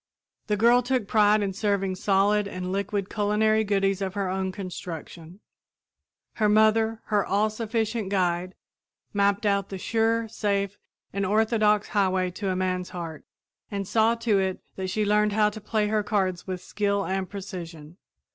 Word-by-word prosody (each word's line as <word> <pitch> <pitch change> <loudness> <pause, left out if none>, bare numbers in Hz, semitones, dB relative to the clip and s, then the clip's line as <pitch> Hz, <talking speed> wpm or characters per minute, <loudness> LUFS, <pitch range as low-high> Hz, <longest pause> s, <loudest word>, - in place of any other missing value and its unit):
The 210 -2 +1
girl 235 +4 +5
took 250 -3 -1
pride 210 0 +4
in 195 -1 -2
serving 200 -1 0
solid 200 +2 +2
and 185 -2 -5
liquid 200 0 -2
culinary 215 +1 +2
goodies 195 -1 +1
of 190 -1 -3
her 200 -2 -1
own 190 0 -1
construction. 180 -1 -8 1.0
Her 215 -2 +3
mother, 220 +1 +3
her 205 -2 +1
all 210 +2 +1
sufficient 220 -1 -2
guide, 180 -2 0 0.6
mapped 200 +1 +2
out 200 -1 +1
the 195 - -5
sure, 225 +3 +1
safe, 200 -2 -2 0.3
and 200 +1 -1
orthodox 215 +1 +2
highway 185 -3 +1
to 195 +2 -4
a 185 - 0
man's 185 -1 -1
heart 165 -4 -7 0.5
and 200 -2 -4
saw 225 +2 +3
to 230 -3 +1
it 190 -1 -2
that 190 -1 -4
she 215 +2 0
learned 210 0 +2
how 210 0 +3
to 215 +1 -9
play 215 0 0
her 215 0 +2
cards 195 -4 -1
with 185 -1 -4
skill 200 0 -1
and 190 0 -2
precision. 175 -5 -8
200 Hz, 160 wpm, -26 LUFS, 190-215 Hz, 1.0 s, girl